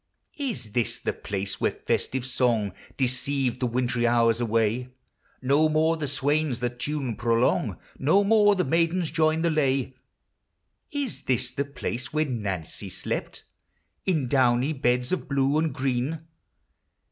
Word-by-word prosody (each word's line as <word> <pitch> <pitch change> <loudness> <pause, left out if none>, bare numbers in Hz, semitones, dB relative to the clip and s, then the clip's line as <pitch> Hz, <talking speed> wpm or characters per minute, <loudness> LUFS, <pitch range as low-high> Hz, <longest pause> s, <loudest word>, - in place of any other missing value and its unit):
Is 135 - -3
this 115 +1 -1
the - - -2
place 100 0 -4
where - - +3
festive 130 -1 -2
song 120 -6 +1 0.2
Deceived 130 0 0
the 125 - +1
wintry 120 0 0
hours 115 -1 +3
away? 115 +1 +1 0.6
No 145 +4 +4
more 160 +1 +3
the 155 -2 -3
swains 145 -1 0
the 120 -1 -1
tune 130 -1 -3
prolong, 115 +1 +1 0.2
No 160 +9 +4
more 205 0 +5
the 185 - +1
maidens 165 +3 +1
join 160 0 +2
the 170 - +2
lay. 135 -4 +1 1.0
Is 285 -5 -3
this 130 -3 0
the 140 - -2
place 135 -2 -5
where 155 +1 +1
Nancy 105 - -4
slept - - -4 0.6
In 160 -9 +1
downy 130 +2 +3
beds 125 -2 +1
of 185 - -2
blue 140 +1 +2
and 160 -1 +1
green? 130 +3 -1
130 Hz, 140 wpm, -26 LUFS, 120-155 Hz, 1.0 s, more